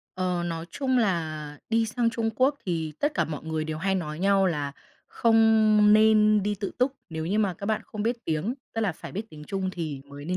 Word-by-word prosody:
Ờ, 180 -1 -1
nói 165 -1 -4
chung 260 -2 0
là 155 -8 -1
đi 225 0 +2
sang 230 +1 0
Trung 225 -1 -1
Quốc 265 +3 +3
thì 165 -3 -2
tất 295 +1 +1
cả - - +2
mọi 150 -2 -6
người 160 -1 -2
đều 155 0 -4
hay 190 +2 0
nói 155 -4 -3
nhau 195 0 +3
là, 145 -5 -1 0.3
không 220 -2 +4
nên 215 -1 +5
đi 205 +1 0
tự 200 0 -4
túc 255 +2 +2 0.2
nếu 160 0 -4
như 200 +5 0
mà 200 -4 +1
các 200 - -7
bạn 220 0 0
không 210 -1 -5
biết 235 +1 -2
tiếng, 165 +9 -1 0.2
tức 225 - -1
là 200 -5 +1
phải - - -10
biết 205 - -3
tiếng 150 -1 -11
Trung 190 +3 -2
thì 155 -6 -4
mới 140 +1 -11
nên 180 +3 -1
195 Hz, 230 wpm, -26 LUFS, 160-220 Hz, 0.3 s, nên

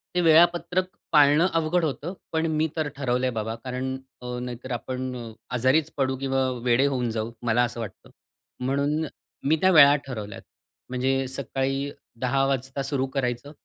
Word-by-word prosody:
ते 180 - +3
वेळापत्रक 170 +2 +4 0.3
पाळणं 150 +3 +6
अवघड 165 +2 +1
होतं. 150 +4 -3 0.2
पण 160 0 +1
मी 155 +1 +1
तर 155 -2 0
ठरवलं 130 -2 0
आहे 125 - +1
बाबा 110 0 -3
कारण 130 +1 -3 0.3
अ, 125 0 -4
नाहीतर 125 +1 -6
आपण 130 +2 -3
अ, 115 -2 -7 0.2
आजारीच 135 +6 +2
पडू 130 -1 +1
किंवा 135 -1 +1
वेडे 125 +2 +3
होऊन 125 -4 -1
जाऊ 110 +1 -3
मला 120 +1 +3
असं 120 0 -3
वाटतं. 115 -3 -8 0.5
म्हणून 140 +4 0 0.4
मी 150 +3 +4
त्या 190 0 +5
वेळा 145 -3 +8
ठरवल्यात. 105 -6 -6 0.5
म्हणजे 130 +1 0 0.2
सकाळी 135 +1 -2 0.3
10 135 +2 +2
वाजता 135 0 -1
सुरु 135 -1 0
करायचं 125 +1 -2
135 Hz, 160 wpm, -25 LUFS, 125-150 Hz, 0.5 s, वेळा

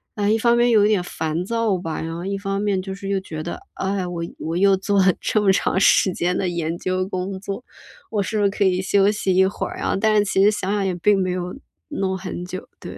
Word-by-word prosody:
哎， 205 -1 0
一 220 - +3
方 235 +1 +3
面 240 0 +4
有 210 -2 +5
一 - - +3
点 195 -5 +2
烦 160 0 -3
躁 230 -2 0
吧， 165 -2 -4
然 165 0 -4
后 170 - -6
一 200 0 -2
方 195 0 -2
面 200 -2 +1
就 190 0 -6
是 195 0 -7
又 195 -1 +1
觉 155 -4 -6
得， 170 - -5
“哎 195 +1 -2
呀， 180 - -2
我 170 -1 -4 0.2
我 165 +1 -3
又 195 0 +4
做 200 +1 +1
了 185 - +5
这 215 - +1
么 195 -2 +4
长 190 - +1
时 190 -1 +4
间 180 +1 0
的 185 - 0
研 170 -1 -2
究 185 +1 -1
工 190 0 -3
作， 200 +5 -6 0.5
我 210 -2 0
是 215 +3 -2
不 205 - +1
是 200 - +4
可 205 - 0
以 185 0 +2
休 200 +1 +3
息 195 -3 0
一 190 0 +5
会 195 - -3
儿 - - -8
啊”， - - 0
但 215 0 +3
是 205 - +4
其 195 0 +2
实 210 - +6
想 200 -2 -2
想 200 -2 0
也 185 - 0
并 200 +3 +3
没 185 -1 0
有 180 +2 -4 0.3
弄 195 -10 -2
很 180 -1 -6
久， 185 +1 -7
对。 - - -9
195 Hz, 290 characters per minute, -22 LUFS, 180-205 Hz, 0.5 s, 实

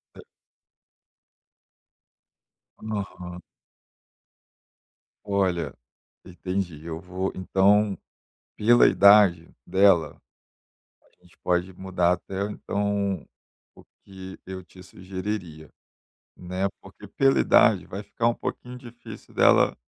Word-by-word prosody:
Ah - - -12 2.6
Aham. 95 -4 -6 1.8
Olha, 95 -4 -1 0.5
entendi. 90 -3 -5
Eu 80 -1 -5
vou 95 +2 -4
então, 100 +2 +2 0.6
pela 120 +3 +5
idade 100 -4 +5 0.2
dela, 95 -4 +3 0.8
a - - -33
gente - - -23
pode 90 +1 -1
mudar 90 -1 0
até 95 +2 -4
um 105 - -4
então, 100 -2 -2 0.5
o - - -18 0.2
que 95 -1 -11
eu 95 0 -7
te 90 +1 -16
sugeriria, 95 -4 -7 0.7
né? 90 +2 -3
Porque - - -14
pela 135 0 +2
idade 100 -5 +4
vai 100 +2 -7
ficar 115 +3 -1
um 120 - 0
pouquinho 125 +1 -6
difícil 120 -1 -13
dela - - +4
95 Hz, 95 wpm, -25 LUFS, 90-100 Hz, 2.6 s, pela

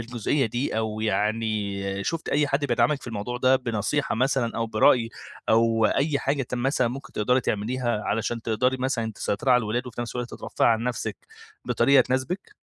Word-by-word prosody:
الجزئية 120 +3 0
دي، 120 +2 -2
أو 110 -1 -2
يعني 105 -3 -1
شُفتِ 165 -1 -3
أي 150 0 +2
حد 140 +1 0
بيدعمِك 125 +2 +2
في - - -11
الموضوع 115 +2 -4
ده 130 +1 +4
بنصيحة 120 +3 -1
مثلًا 125 -1 0
أو 115 - 0
برأي 115 +1 +3 0.4
أو 115 0 +3
أي 140 +5 +1
حاجة 140 0 0
ت 125 - -5
مثلًا 125 0 +1
ممكن 135 +3 -8
تقدري 125 +5 +2
تعمليها 120 +1 -1
علشان 115 +2 -2
تقدري 125 +4 +1
مثلًا 125 -4 -1
تسيطري 105 +6 -1
على 125 - +7
الولاد، 120 +3 -2
وفي 120 -1 -6
نَفس 120 -2 -5
الوقت 125 -1 -4
ترفهي - - 0
عن 115 -1 +2
نَفسِك 125 -1 -3 0.5
بطريقة 140 0 +4
تناسبِك؟ 130 +10 -2
120 Hz, 175 wpm, -25 LUFS, 110-130 Hz, 0.5 s, على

